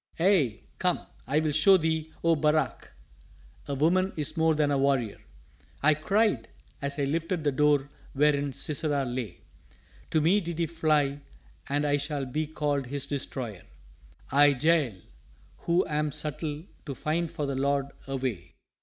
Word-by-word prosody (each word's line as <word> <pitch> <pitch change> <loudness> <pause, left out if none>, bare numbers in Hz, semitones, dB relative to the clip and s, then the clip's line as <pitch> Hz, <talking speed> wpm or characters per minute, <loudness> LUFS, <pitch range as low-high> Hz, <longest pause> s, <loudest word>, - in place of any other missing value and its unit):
"Aye, 165 - +3 0.2
come, 180 -1 +1 0.3
I 145 +3 +2
will 155 -1 0
show 160 +6 +6
thee, 160 -1 -1
O 165 0 +4
Barak, 150 -3 0 0.8
a 140 - -2
woman 185 +7 +2
is 150 +1 -2
more 160 -1 +3
than 150 -1 +2
a 140 - +2
warrior," 135 -6 +1 0.6
I 155 +1 +6
cried 195 - +1 0.3
as 140 +1 -2
I 145 - 0
lifted 165 +4 -1
the 145 - +2
door 145 0 +3 0.3
wherein 145 0 +2
Sisera 145 0 -1
lay. 120 -8 -5 0.7
"To 160 - +2
me 175 +7 +3
did 170 -2 -5
he 170 - +1
fly 155 -3 +1 0.5
and 145 +1 +1
I 145 0 +2
shall 145 -1 -3
be 150 +4 -2
called 145 -3 -1
his 140 +1 -2
destroyer 130 -8 -4 0.7
I, 145 0 +5
Jael, 155 - +3 0.7
who 175 +2 +3
am 150 -1 -1
subtle 150 +1 -4 0.2
to 140 - -4
find 165 +4 -1
for 160 -3 -3
the 140 - -2
Lord 140 +1 0 0.2
a 135 - -3
way!" 115 -10 -4
150 Hz, 155 wpm, -28 LUFS, 140-160 Hz, 0.8 s, show